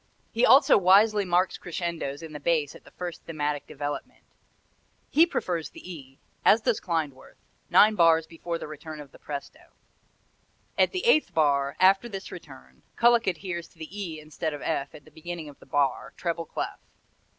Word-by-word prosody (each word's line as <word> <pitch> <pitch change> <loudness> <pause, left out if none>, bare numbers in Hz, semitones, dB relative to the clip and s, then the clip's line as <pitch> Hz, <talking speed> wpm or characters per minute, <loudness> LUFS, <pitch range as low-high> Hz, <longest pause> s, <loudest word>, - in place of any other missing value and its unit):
He 235 +2 +3
also 265 -5 +7
wisely 200 +3 +5
marks 180 +1 +1
crescendos 170 -4 -4
in 160 -1 -9
the 150 - -6
bass 155 -2 0
at - - -15
the - - -14
first 175 -2 -7
thematic 150 -2 -3
development. 145 +1 -6 0.9
He 325 +3 +6
prefers 175 - -2
the 180 - -10
E 135 -4 -12 0.3
as 225 - +5
does 235 -1 +1
Klindworth 155 -6 -3 0.3
nine 215 +1 +6
bars 165 -4 +4
before 170 +1 -5
the - - -7
return 155 +1 -9
of 145 -2 -11
the - - -17
presto. 140 -1 -7 1.2
At - - +3
the 370 +2 -3
eighth 310 -10 +3
bar, 140 -3 +2
after 195 +5 +4
this 195 -3 -7
return, 65 - -12
Kullak 235 -1 +4
adheres 175 -2 -3
to 170 - -27
the 160 -1 -8 0.2
E 160 -3 -6
instead 155 0 -4
of 145 - -9
F 140 -3 -2
at 145 - -14
the - - -18
beginning 165 -1 -7
of 145 - -15
the - - -17
bar, 140 -1 0
treble 170 -1 -2
clef. - - -5
165 Hz, 175 wpm, -27 LUFS, 150-185 Hz, 1.2 s, also